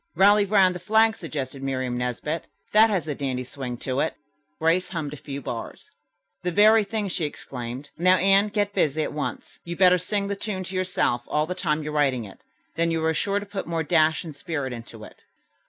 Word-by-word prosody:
"'Rally 205 +3 +6
Round 195 -2 +4
the 180 - -6
Flag,'" 220 +4 +3
suggested 140 -7 -5
Miriam 130 -2 -2
Nesbit. 125 +6 -3 0.3
"That 220 +1 +6
has 185 -7 -1
a 150 - -1
dandy 130 -2 -3
swing 125 -1 -6
to 130 0 -1
it." - - 0 0.4
Grace 165 +3 +2
hummed 155 -5 -4
a - - -7
few 140 0 -7
bars. 115 -2 -6 0.5
"The 180 - -1
very 215 +4 +6
thing," 205 0 -2
she 185 -2 -2
exclaimed. 130 -1 -7
"Now, 185 +2 +5
Anne, 195 +2 +4
get 205 -1 -1
busy 155 -2 +1
at - - -4
once. 150 - -5
You'd 170 0 -6
better 180 -1 +5
sing 200 +3 -1
the 200 - -2
tune 200 -2 -4
to 185 +1 -7
yourself 185 -9 0
all 150 0 +1
the 180 - -3
time 150 -3 -1
you're 150 0 -5
writing 135 -5 +1
it, 100 - -13 0.3
then 165 0 +1
you'll 160 -1 0
be 160 - +2
sure 200 +6 0
to 205 - -8
put 200 -1 -5
more 165 -1 -1
dash 160 -1 +3
and 160 -4 -8
spirit 145 -4 -4
into 115 -2 -9
it." - - -14
165 Hz, 210 wpm, -25 LUFS, 140-195 Hz, 0.5 s, Rally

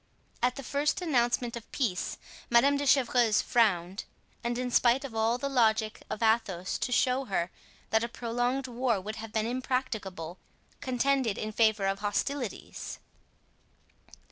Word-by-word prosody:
At 250 +1 +2
the 275 - -7
first 285 +4 0
announcement 240 -5 +1
of 235 -1 -9
peace 210 -10 -1 0.3
Madame 245 +4 +5
de 285 0 -1
Chevreuse 245 -5 +4
frowned, 195 -5 +1 0.4
and 240 0 -1
in 250 0 -2
spite 250 +3 +4
of 260 - -7
all 225 +2 +1
the 280 - -2
logic 220 -5 +2
of 220 - -3
Athos 200 -5 +1
to 250 - -2
show 255 +2 +2
her 180 -5 -1 0.4
that 220 +1 +3
a - - 0
prolonged 245 +3 -1
war 245 -3 0
would 215 +4 -6
have 225 -1 -7
been 220 0 0
impracticable, 225 -9 -3 0.4
contended 260 -3 +1
in 215 - -3
favor 220 -2 +3
of 195 0 0
hostilities. 220 +4 -3
235 Hz, 145 wpm, -29 LUFS, 215-255 Hz, 0.4 s, Madame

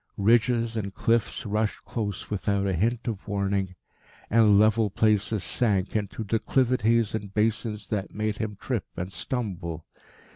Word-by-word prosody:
Ridges 115 +2 +3
and 100 -3 -2
cliffs 115 +3 0
rushed 105 +1 -1
close 105 -3 -4
without 100 -1 0
a 95 - +1
hint 115 +8 0
of 110 -3 -4
warning, 100 -2 -1 0.6
and 105 -2 +6
level 110 0 +4
places 105 0 +1
sank 100 -4 0
into 105 +1 -2
declivities 115 0 +2
and 105 -3 -4
basins 105 0 -1
that 105 -2 -2
made 105 0 -2
him 105 -2 -4
trip 120 -7 -2
and 90 +2 -4
stumble. 90 - -4
105 Hz, 140 wpm, -26 LUFS, 100-115 Hz, 0.6 s, and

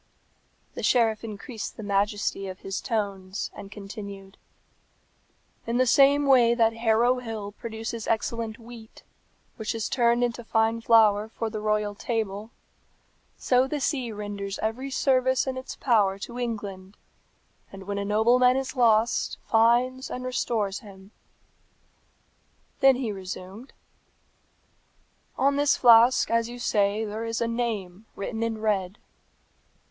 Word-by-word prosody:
The - - -6
sheriff 225 -3 +2
increased 220 +1 -7
the 220 - -7
majesty 200 0 -1
of 185 -1 -8
his 195 0 -4
tones, 200 -3 -3
and 195 - -10
continued, 200 -1 -9 1.3
"In 235 +1 0
the 255 - +3
same 280 +3 +5
way 245 -4 +5
that 225 -1 +3
Harrow 230 +2 +2
Hill 220 -4 -6
produces 225 +1 -6
excellent 225 0 -2
wheat, 230 -1 -13 0.5
which 220 0 -3
is 225 -1 -2
turned 240 -1 +2
into 240 0 -2
fine 225 0 +1
flour 215 -2 +4
for 225 0 -4
the 215 - -4
royal 210 -1 0
table, 215 -1 -3 0.9
so 255 +1 +2
the 295 +2 -3
sea 260 -4 -1
renders 205 -2 -5
every 240 +5 -2
service 260 -1 +2
in 265 -1 -3
its 260 0 -7
power 205 -6 +2
to 235 +5 -7
England, 205 -5 -5 0.7
and 195 -1 -10
when 200 +1 -4
a - - -2
nobleman 240 +5 +3
is 270 +1 -4
lost 230 -2 +2
finds 245 +3 +2
and 250 0 -5
restores 220 -5 -1
him." 195 -1 -15 1.7
Then 270 -1 +6
he 245 -4 -3
resumed, 190 +4 -8 1.7
"On 280 +1 +2
this 290 0 +3
flask, 240 0 +6
as 230 0 +1
you 245 - -8
say, 210 -2 +1
there 215 +2 -5
is 230 0 -3
a 235 - 0
name 220 -4 -3
written 220 +3 -4
in 230 -1 -1
red." 200 -2 -1
225 Hz, 135 wpm, -26 LUFS, 205-245 Hz, 1.7 s, Then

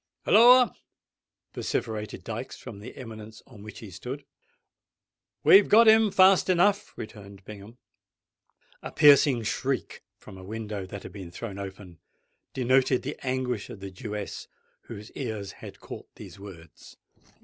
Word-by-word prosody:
"Holloa?" 245 +3 +6 0.8
vociferated 110 -1 -4
Dykes, - - -6
from 100 - -10
the 105 - -11
eminence 110 -3 -10
on 115 -6 -15
which 105 +1 -11
he 105 -4 -10
stood. 125 +10 -8 1.2
"We've 195 +1 +7
got 225 +2 +6
him, 220 0 +6
fast 190 -1 +4
enough," 195 +3 +1
returned 100 -3 -10
Bingham. 105 +3 -11 1.0
A - - -7
piercing 140 -4 +5
shriek 130 +4 -3 0.2
from 95 - -13
a - - -11
window 105 -1 -6
that 100 +1 -9
had - - -9
been 95 -4 -9
thrown 100 +2 -8
open, 95 -3 -9 0.6
denoted 130 0 +2
the - - -6
anguish 130 -4 -3
of - - -9
the 100 0 -8
Jewess, 105 0 -7 0.4
whose 105 +2 -10
ears 110 -7 -5
had - - -10
caught - - -10
these - - -12
words. 85 -5 -13
110 Hz, 140 wpm, -26 LUFS, 100-135 Hz, 1.2 s, We've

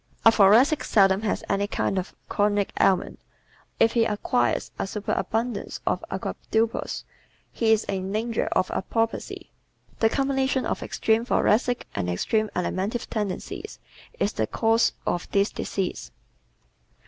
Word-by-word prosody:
A 225 - +9
Thoracic 225 +9 +5
seldom 195 -1 +4
has 220 - -1
any 200 +1 0
kind 195 -2 -1
of 180 - -7
chronic 205 -1 +1
ailment. 190 -2 +2 0.6
If 225 - +5
he 235 - +3
acquires 165 - 0
a - - -1
superabundance 220 +2 -2
of - - 0
avoirdupois 225 +1 -2 0.5
he 225 -1 +1
is 220 -1 +4
in 190 -1 -3
danger 225 +2 -1
of 185 - +1
apoplexy. 225 +4 -2 0.5
The 225 - +4
combination 270 0 0
of - - -2
extreme 220 +1 +1
Thoracic 245 0 +1
and 90 -3 -2
extreme 215 - 0
Alimentive 190 +6 -2
tendencies 210 -4 -4 0.4
is - - 0
the - - -1
cause 225 0 +2
of 175 - -2
this 200 +1 +2
disease. 190 -2 -3
215 Hz, 130 wpm, -25 LUFS, 195-230 Hz, 0.6 s, A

